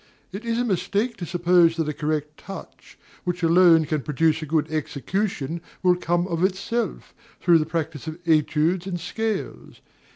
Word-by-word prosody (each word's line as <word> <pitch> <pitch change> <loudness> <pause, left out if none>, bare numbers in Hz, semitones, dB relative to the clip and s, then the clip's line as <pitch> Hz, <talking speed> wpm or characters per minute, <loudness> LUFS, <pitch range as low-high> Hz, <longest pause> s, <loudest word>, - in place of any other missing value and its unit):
It 200 +4 -7
is 230 0 0
a 245 - +1
mistake 210 +3 0
to 175 - -5
suppose 170 -1 +4
that 165 -2 -1
a 150 - -1
correct 150 0 -2
touch, 195 0 -11 0.3
which 175 -1 -3
alone 165 -1 +6
can 150 -1 -1
produce 155 +3 +1
a 155 - -5
good 155 0 0
execution, 160 +1 -2 0.2
will 180 -1 +5
come 175 0 0
of 170 -1 -1
itself, 200 +4 -2 0.3
through 170 -2 +5
the 155 - -1
practice 160 -2 -3
of 160 - -4
études 160 +3 +2
and 180 -2 -3
scales. 220 +5 -4
170 Hz, 165 wpm, -24 LUFS, 155-185 Hz, 0.3 s, alone